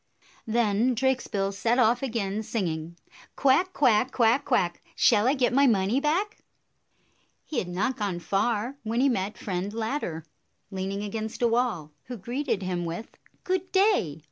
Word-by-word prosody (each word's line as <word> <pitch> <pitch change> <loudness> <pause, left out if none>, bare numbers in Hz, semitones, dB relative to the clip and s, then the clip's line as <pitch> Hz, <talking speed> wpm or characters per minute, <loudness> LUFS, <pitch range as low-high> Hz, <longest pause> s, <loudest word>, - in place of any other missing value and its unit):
Then 230 +2 +2
Drakesbill 230 -6 0
set 225 +5 +1
off 245 0 +3
again, 220 -5 -2
singing, 170 -7 -3 0.4
"Quack, 280 +8 +3
quack! 255 -4 +3
Quack, 240 +3 +3
quack! 190 -10 0
Shall 220 0 +4
I 270 - +3
get 250 -2 +1
my 280 +2 +5
money 210 +2 +2
back?" 360 +9 -1 1.1
He 305 - -2
had 180 - -4
not 195 +9 -1
gone 200 -5 -2
far 215 +8 -1
when 225 +2 -2
he 275 +2 +4
met 205 -4 -2
Friend 190 0 -3
Ladder, 220 - -3 0.5
leaning 195 +1 -3
against 220 +3 -4
a - - +5
wall, 230 -10 0
who 245 -1 -7
greeted 235 0 -2
him 180 -1 -2
with, 170 +7 -5 0.2
" - - -39
Good 370 0 -2
day 380 - +2
225 Hz, 155 wpm, -26 LUFS, 195-260 Hz, 1.1 s, my